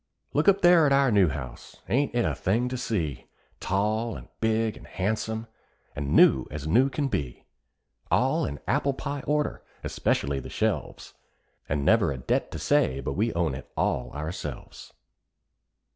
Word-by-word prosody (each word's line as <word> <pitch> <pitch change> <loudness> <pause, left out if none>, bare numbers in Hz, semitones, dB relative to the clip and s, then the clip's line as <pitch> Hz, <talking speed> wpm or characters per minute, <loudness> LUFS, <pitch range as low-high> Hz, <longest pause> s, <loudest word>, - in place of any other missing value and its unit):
Look 150 +5 +1
up 200 0 +5
there 175 -3 +6
at - - +1
our 135 -2 +4
new 100 -4 +5
house! 65 -3 -7
ain't 135 0 +1
it 120 - +2
a - - 0
thing 115 +6 0
to 130 - -3
see? 95 - -3 0.3
Tall 110 +4 0
and - - -10
big 110 0 +1
and - - -13
handsome, 110 +3 -2 0.5
and 70 0 -2
new 65 - +6
as 75 +1 -6
new 125 +12 +4
can 145 +1 -1
be; 70 - -4 0.6
All - - +2
in 70 0 -4
apple 140 - +1
pie 145 -1 -4
order, 150 0 0 0.2
especially 70 0 0
the - - -9
shelves, - - -2 0.6
And 70 -1 -1
never - - +4
a 70 - -4
debt 65 - -1
to - - -6
say 65 +1 +2
but 70 - -3
what 70 - -6
we 110 +3 +1
own 85 -4 +1
it 65 - -8
all 60 - 0
ourselves. 75 -2 -7
105 Hz, 170 wpm, -27 LUFS, -, 0.6 s, there